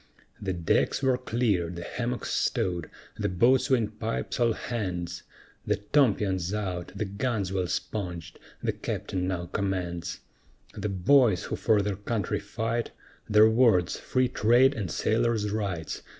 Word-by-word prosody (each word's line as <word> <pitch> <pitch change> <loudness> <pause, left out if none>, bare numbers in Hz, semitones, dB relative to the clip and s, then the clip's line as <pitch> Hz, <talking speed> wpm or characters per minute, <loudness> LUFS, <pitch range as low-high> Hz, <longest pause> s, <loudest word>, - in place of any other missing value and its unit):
The 95 -2 -1
decks 85 +9 +1
were 130 -1 +4
cleared, 105 -9 0
the 85 - -6
hammocks 120 +5 -3
stowed, 85 -4 0 0.3
the - - 0
boatswain 120 +4 +3
pipes 65 - -4
all 120 -1 +3
hands, 90 -8 -4 0.5
The 105 - +3
tompions 100 - +1
out, 90 -4 -3
the 105 - -2
guns 100 -1 -2
well 95 -2 0
sponged, 90 -4 -4 0.2
the - - +1
Captain 90 -1 -3
now 90 -2 -2
commands; 90 -3 -3 0.5
The 105 - -3
boys 100 +1 +4
who - - -3
for 110 -3 +2
their 100 -2 -2
country 105 -1 -2
fight, 115 +1 -2 0.4
Their 105 +1 +7
words, 110 -8 +3
"Free 130 0 +1
Trade 125 +4 +4
and 100 -9 -4
Sailor's 105 +5 +1
Rights!" 100 -7 -3
105 Hz, 135 wpm, -27 LUFS, 90-115 Hz, 0.5 s, Their